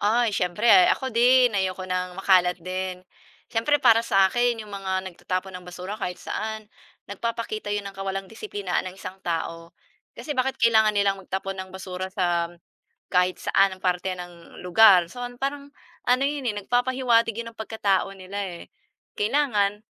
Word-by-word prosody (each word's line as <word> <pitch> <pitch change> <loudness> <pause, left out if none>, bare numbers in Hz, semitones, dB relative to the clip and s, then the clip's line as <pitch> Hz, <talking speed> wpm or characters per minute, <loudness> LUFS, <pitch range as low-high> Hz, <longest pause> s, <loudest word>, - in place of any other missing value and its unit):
ay, 225 +2 +2
siyempre 185 +1 +4
ako 260 -2 0
din 245 +1 +5
ayoko 190 -2 -1
ng 185 -1 -3
makalat 185 -2 +3
din. 185 +1 -5 0.5
Siyempre 235 +6 +2
para 230 -5 +5
sa 195 -4 +3
akin 240 -1 +2
'yong 210 - -13
mga 195 -1 -4 0.2
nagtatapon 185 +2 -4
ng 180 -1 -9
basura 185 +4 -7
kahit 180 -2 -3
saan, 220 0 -5 0.4
nagpapakita 220 0 -4
'yon 205 0 -2
ng 200 - -7
kawalang 195 0 -3
disiplinaan 200 -3 -4
ng 185 - -12
isang 190 0 -9
tao. 165 -1 -4 0.4
Kasi, 300 - -4
bakit 260 +1 0
kailangan 220 -2 +5
nilang 200 -1 +1
magtapon 190 +1 -4
ng 190 0 -7
basura 185 0 -5
sam, 175 -3 0 0.6
kahit 180 0 +3
saan 195 -1 +2
na - - -20
parte 185 0 0
ng 175 -1 -11
lugar, 180 -1 +6
so 245 - -10 0.2
parang, 280 +1 -3 0.4
ano 250 +2 +3
'yon 285 -3 -3
eh, - - -10
nagpapahiwatig 245 -2 +2
'yon 230 0 -5
ng 220 - -30
pagkatao 200 -3 0
nila 190 +1 -7
eh, 175 -3 -8 0.4
kailangan 210 -4 +1
195 Hz, 160 wpm, -25 LUFS, 185-230 Hz, 0.6 s, lugar